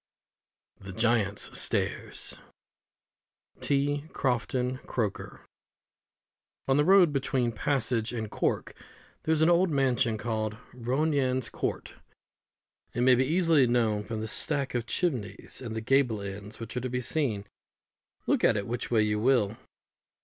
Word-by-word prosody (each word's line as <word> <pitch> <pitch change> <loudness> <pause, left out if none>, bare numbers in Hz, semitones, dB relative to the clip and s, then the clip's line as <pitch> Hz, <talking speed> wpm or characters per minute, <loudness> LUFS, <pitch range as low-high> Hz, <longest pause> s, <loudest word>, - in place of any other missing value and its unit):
THE 95 -1 -9
GIANT'S 110 -2 +1
STAIRS. - - 0 1.2
T. 145 +1 0
CROFTON 125 0 -1
CROKER. 110 -5 -3 1.3
On 135 0 +3
the 145 - +4
road 185 -4 +6
between 130 -3 0
Passage 115 -2 0
and 110 -3 -4
Cork - - -1 0.5
there 160 - -1
is 160 0 +3
an 160 - +5
old 175 +2 +4
mansion 130 -5 +1
called 110 -2 -3 0.2
Ronayne's 130 0 0
Court. - - -4 1.0
It 120 - 0
may 130 +1 +6
be 130 +1 +3
easily 165 -4 +3
known 115 -3 +1
from 110 0 -5
the 110 - -3
stack 140 +4 +1
of 120 -1 -2
chimneys 130 - -3
and 115 -2 -5
the 110 - -3
gable 125 -2 +2
ends, 100 +2 -7
which 115 0 -7
are 125 - -1
to 130 - -3
be 125 +1 -2
seen, 120 -7 0 0.8
look - - +1
at - - +4
it 100 - -2
which 120 +3 -4
way 110 -3 +3
you 105 0 0
will. 115 -3 +2
125 Hz, 140 wpm, -28 LUFS, 110-140 Hz, 1.3 s, road